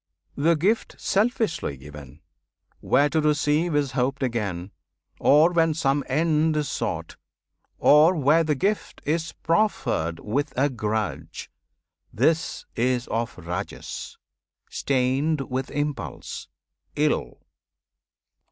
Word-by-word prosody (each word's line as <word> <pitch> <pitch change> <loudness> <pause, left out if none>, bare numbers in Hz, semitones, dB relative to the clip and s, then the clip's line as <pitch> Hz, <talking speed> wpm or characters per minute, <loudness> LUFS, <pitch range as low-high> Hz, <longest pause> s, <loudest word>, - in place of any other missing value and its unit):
The 165 +4 +3
gift 200 +9 0
selfishly 205 - 0
given, 75 +1 -12 0.6
where 145 - +3
to 160 0 +1
receive 150 +2 +1
Is 145 -2 +1
hoped 135 +2 -1
again, 100 -7 -2 0.5
or 155 +4 +5
when 165 -2 +2
some 145 -2 +1
end 155 +2 +2
is 150 -1 0
sought, - - -4 0.6
Or 155 +5 +6
where 155 +2 +4
the 150 -2 0
gift 200 +10 -2
is 160 +2 -1
proffered 135 - 0
with 135 +8 -2
a 140 +2 +2
grudge, 110 -3 -3 0.6
This 150 +8 0
is 125 +1 +1
of 115 0 -2
Rajas, 90 0 -6 0.5
stained 135 +3 0
with 130 +1 -2
impulse, 145 - -4 0.5
ill. - - 0
145 Hz, 105 wpm, -25 LUFS, 120-160 Hz, 0.6 s, Or